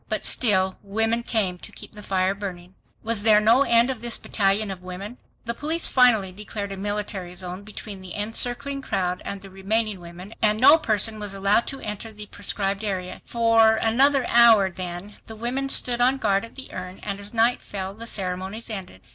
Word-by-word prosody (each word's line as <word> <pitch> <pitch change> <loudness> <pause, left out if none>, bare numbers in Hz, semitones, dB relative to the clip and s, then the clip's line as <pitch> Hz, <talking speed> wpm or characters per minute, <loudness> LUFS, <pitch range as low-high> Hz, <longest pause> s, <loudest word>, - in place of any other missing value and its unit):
But - - -1
still 190 -5 +2
women 225 +3 0
came 200 -6 -1
to - - -11
keep - - -10
the 210 - -10
fire 190 -1 0
burning. 185 -3 -8 0.3
Was 225 -2 +1
there 210 0 +6
no 225 +5 +4
end 235 -1 +4
of 245 -4 -7
this 235 -1 -1
battalion 200 0 0
of 185 -1 -8
women? 190 +6 -8 0.3
The 235 - -2
police 315 +6 0
finally 230 -7 +4
declared 205 +1 -6
a - - -4
"military 200 -3 -3
zone" 180 +1 -5
between 205 -1 -9
the 185 -1 -8
encircling 245 +6 -2
crowd 180 -7 -2
and 200 -1 -6
the 195 - -12
remaining 205 +2 -1
women, 175 +4 -11
and 215 0 +2
no 290 +6 +7
person 215 -3 0
was 205 -2 -5
allowed 200 +4 +2
to 275 - -6
enter 210 +2 -6
the 210 -1 -9
proscribed 200 0 -2
area. 185 -3 -4
For, 230 -1 +4
another 260 +4 +3
hour, 225 -5 +6
then, 180 +2 -7
the 220 - -9
women 250 +5 -2
stood 245 -2 +1
on 255 +2 +3
guard 200 -4 +1
at 230 - -16
the 265 - -10
urn, 185 +1 -7
and 200 -1 -4
as 200 0 -8
night 235 +1 +2
fell, 190 -1 -6
the 230 +3 -8
ceremonies 190 +3 -3
ended. 185 - -8
210 Hz, 195 wpm, -24 LUFS, 190-230 Hz, 0.3 s, no